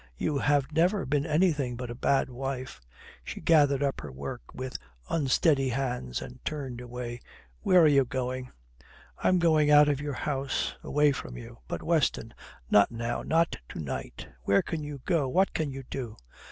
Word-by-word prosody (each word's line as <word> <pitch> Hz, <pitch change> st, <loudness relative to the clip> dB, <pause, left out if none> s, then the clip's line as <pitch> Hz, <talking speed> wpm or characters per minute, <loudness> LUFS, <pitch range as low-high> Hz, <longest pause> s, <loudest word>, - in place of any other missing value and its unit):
You 145 Hz, -, 0 dB
have 145 Hz, 0 st, +2 dB
never 180 Hz, +6 st, +2 dB
been 145 Hz, +3 st, 0 dB
anything 150 Hz, -6 st, +1 dB
but 125 Hz, 0 st, -5 dB
a -, -, -4 dB
bad 135 Hz, +2 st, +1 dB
wife." 130 Hz, 0 st, -5 dB, 0.4 s
She -, -, -6 dB
gathered 145 Hz, -4 st, +4 dB
up 140 Hz, -1 st, -1 dB
her 75 Hz, -, -8 dB
work 70 Hz, 0 st, -6 dB
with 130 Hz, 0 st, -6 dB, 0.3 s
unsteady 140 Hz, -2 st, +2 dB
hands 125 Hz, -, -2 dB
and 60 Hz, -, -11 dB
turned 135 Hz, -5 st, -4 dB
away. 120 Hz, 0 st, -6 dB, 0.4 s
"Where 180 Hz, -2 st, +5 dB
are -, -, +7 dB
you 140 Hz, -2 st, +5 dB
going?" 130 Hz, 0 st, -3 dB, 0.7 s
"I -, -, 0 dB
am 185 Hz, -, +4 dB
going 155 Hz, -3 st, +4 dB
out 150 Hz, 0 st, +7 dB
of 145 Hz, -1 st, 0 dB
your 145 Hz, -2 st, -3 dB
house. 135 Hz, -1 st, -2 dB
Away 150 Hz, 0 st, +3 dB
from 60 Hz, -, -6 dB
you." -, -, -10 dB
"But, -, -, -4 dB
Weston -, -, +1 dB, 0.4 s
not 100 Hz, -1 st, +6 dB
now, 120 Hz, 0 st, -3 dB
not 165 Hz, +1 st, +1 dB
to -, -, -7 dB
night. 70 Hz, -4 st, -5 dB
Where 100 Hz, +10 st, +3 dB
can 160 Hz, -, -4 dB
you 145 Hz, -2 st, -7 dB
go? 165 Hz, -7 st, +2 dB
What 190 Hz, +8 st, +2 dB
can 155 Hz, -3 st, -1 dB
you 135 Hz, 0 st, -7 dB
do?" 120 Hz, -5 st, -5 dB
135 Hz, 180 wpm, -28 LUFS, 125-150 Hz, 0.7 s, are